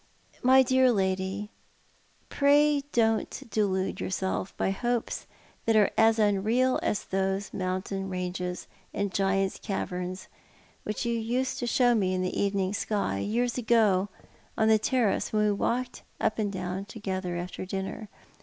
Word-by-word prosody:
"^ly 260 Hz, +1 st, +6 dB
dear 260 Hz, 0 st, +4 dB
lady, 190 Hz, 0 st, -1 dB, 0.8 s
pray 290 Hz, +1 st, +4 dB
don't 225 Hz, -2 st, +1 dB
delude 190 Hz, -3 st, 0 dB
yourself 190 Hz, 0 st, -2 dB
by -, -, +1 dB
hopes 240 Hz, +3 st, -2 dB, 0.4 s
that 225 Hz, -, +4 dB
are 210 Hz, -2 st, +4 dB
as 225 Hz, 0 st, +4 dB
unreal 220 Hz, +5 st, +2 dB
as 205 Hz, -, -1 dB
those 195 Hz, +1 st, -2 dB
mountain 190 Hz, +1 st, -3 dB
ranges 180 Hz, -1 st, -4 dB, 0.3 s
and 200 Hz, -2 st, -1 dB
giant's 195 Hz, 0 st, +1 dB
caverns 185 Hz, -2 st, -4 dB, 0.5 s
which 210 Hz, +3 st, -4 dB
you 235 Hz, -, 0 dB
used 240 Hz, +3 st, -1 dB
to 245 Hz, -, -2 dB
show 245 Hz, 0 st, +4 dB
me 190 Hz, -5 st, +1 dB
in 185 Hz, -, -1 dB
the 185 Hz, -, -2 dB
evening 195 Hz, -1 st, 0 dB
sky, 200 Hz, -, -1 dB
years 240 Hz, -, 0 dB
ago, 215 Hz, -5 st, +3 dB, 0.5 s
on 220 Hz, 0 st, +3 dB
the 220 Hz, -1 st, +5 dB
terrace, 230 Hz, -2 st, +1 dB
when 215 Hz, -1 st, +2 dB
we 210 Hz, -, +3 dB
walked 245 Hz, +5 st, -1 dB, 0.2 s
up 215 Hz, -, 0 dB
and 205 Hz, -2 st, 0 dB
down 185 Hz, 0 st, -4 dB
together 190 Hz, -4 st, -4 dB
after 175 Hz, +1 st, -5 dB
dinner. 195 Hz, +3 st, -5 dB
205 Hz, 145 wpm, -28 LUFS, 190-230 Hz, 0.8 s, ^ly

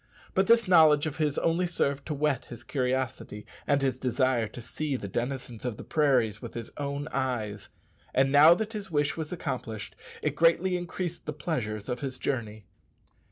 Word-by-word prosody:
But 190 Hz, +1 st, +2 dB
this 230 Hz, -1 st, +5 dB
knowledge 155 Hz, -4 st, +6 dB
of 155 Hz, -2 st, -4 dB
his 150 Hz, -2 st, 0 dB
only 170 Hz, +2 st, +1 dB
served 140 Hz, -5 st, -1 dB
to 155 Hz, -, -2 dB
whet 145 Hz, -2 st, 0 dB
his 120 Hz, -, -10 dB
curiosity 125 Hz, -5 st, -2 dB, 0.2 s
and 140 Hz, -1 st, +2 dB
his 130 Hz, -2 st, 0 dB
desire 125 Hz, -2 st, +1 dB
to 120 Hz, -, -10 dB
see 140 Hz, +5 st, -3 dB
the 105 Hz, -, -4 dB
denizens 120 Hz, +2 st, -4 dB
of 125 Hz, -4 st, -3 dB
the -, -, -8 dB
prairies 125 Hz, -9 st, +2 dB
with -, -, -8 dB
his 115 Hz, -1 st, -6 dB
own 145 Hz, 0 st, -3 dB
eyes; 115 Hz, -6 st, -2 dB, 0.4 s
and 135 Hz, +1 st, +3 dB
now 150 Hz, +4 st, +8 dB
that 220 Hz, +3 st, -3 dB
his 205 Hz, -3 st, -5 dB
wish 145 Hz, -2 st, +1 dB
was 160 Hz, -2 st, -5 dB
accomplished, 125 Hz, -, -4 dB, 0.3 s
it -, -, 0 dB
greatly 170 Hz, +2 st, +3 dB
increased 175 Hz, -1 st, -4 dB
the 150 Hz, -, -2 dB
pleasures 120 Hz, -, -3 dB
of 125 Hz, -1 st, -2 dB
his 135 Hz, -2 st, -4 dB
journey. 110 Hz, -7 st, -3 dB
140 Hz, 180 wpm, -28 LUFS, 120-155 Hz, 0.4 s, now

